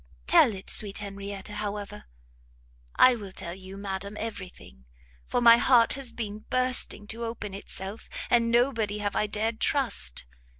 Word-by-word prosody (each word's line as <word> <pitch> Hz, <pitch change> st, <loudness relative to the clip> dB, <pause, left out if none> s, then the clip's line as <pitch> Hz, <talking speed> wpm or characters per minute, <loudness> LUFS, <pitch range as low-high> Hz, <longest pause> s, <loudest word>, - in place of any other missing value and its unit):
"Tell 215 Hz, -, +5 dB
it, 190 Hz, -, -4 dB
sweet 200 Hz, -2 st, 0 dB
Henrietta, 200 Hz, 0 st, -7 dB
however!" 210 Hz, -, -5 dB, 0.9 s
"I 255 Hz, -1 st, +6 dB
will 205 Hz, -4 st, -8 dB
tell 170 Hz, -2 st, -2 dB
you, 190 Hz, +1 st, -10 dB
madam, 200 Hz, +1 st, -5 dB
every 210 Hz, -4 st, -5 dB
thing! 65 Hz, -, -17 dB, 0.4 s
for -, -, 0 dB
my 235 Hz, -1 st, +8 dB
heart 240 Hz, -1 st, +5 dB
has 270 Hz, -3 st, -4 dB
been 215 Hz, -3 st, -5 dB
bursting 255 Hz, -4 st, 0 dB
to 230 Hz, +1 st, -4 dB
open 225 Hz, -3 st, -5 dB
itself, 195 Hz, +1 st, -7 dB, 0.2 s
and 235 Hz, -1 st, +3 dB
nobody 230 Hz, -4 st, +1 dB
have 205 Hz, -1 st, -3 dB
I 210 Hz, -, +1 dB
dared 220 Hz, +2 st, -1 dB
trust. 235 Hz, -, 0 dB
210 Hz, 155 wpm, -27 LUFS, 195-230 Hz, 0.9 s, my